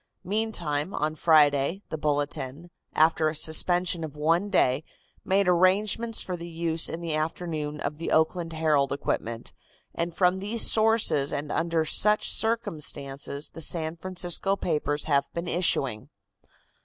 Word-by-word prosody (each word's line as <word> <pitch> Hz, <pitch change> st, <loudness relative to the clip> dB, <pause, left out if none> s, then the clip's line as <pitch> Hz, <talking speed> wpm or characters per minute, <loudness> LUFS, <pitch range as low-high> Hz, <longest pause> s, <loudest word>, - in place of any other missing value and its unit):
Meantime, 185 Hz, -6 st, -2 dB
on 155 Hz, +1 st, -1 dB
Friday, 155 Hz, +2 st, +3 dB
the 160 Hz, -, -4 dB
Bulletin, 145 Hz, +2 st, -3 dB, 0.2 s
after 160 Hz, 0 st, +3 dB
a 155 Hz, -, -6 dB
suspension 175 Hz, +2 st, +2 dB
of 155 Hz, -2 st, -7 dB
one 165 Hz, +6 st, +1 dB
day, 130 Hz, -4 st, +2 dB, 0.4 s
made 195 Hz, 0 st, +1 dB
arrangements 200 Hz, +6 st, +2 dB
for 180 Hz, -, -4 dB
the 170 Hz, 0 st, -8 dB
use 165 Hz, -1 st, -1 dB
in 165 Hz, -, -6 dB
the 165 Hz, -2 st, -3 dB
afternoon 155 Hz, -1 st, -3 dB
of 150 Hz, +1 st, -4 dB
the 165 Hz, -, -4 dB
Oakland 165 Hz, +1 st, +1 dB
Herald 155 Hz, -4 st, +1 dB
equipment, 115 Hz, -4 st, -4 dB, 0.4 s
and 170 Hz, 0 st, -3 dB
from 180 Hz, 0 st, +2 dB
these 215 Hz, +4 st, +2 dB
sources 220 Hz, -10 st, +3 dB
and 145 Hz, +1 st, -4 dB
under 165 Hz, -1 st, 0 dB
such 210 Hz, +6 st, +3 dB
circumstances 150 Hz, -10 st, -1 dB
the 165 Hz, -, -10 dB
San 160 Hz, 0 st, 0 dB
Francisco 185 Hz, +2 st, -1 dB
papers 150 Hz, -5 st, -2 dB
have 140 Hz, -3 st, 0 dB
been 170 Hz, +1 st, -4 dB
issuing. 135 Hz, -11 st, 0 dB
165 Hz, 140 wpm, -26 LUFS, 150-180 Hz, 0.4 s, Friday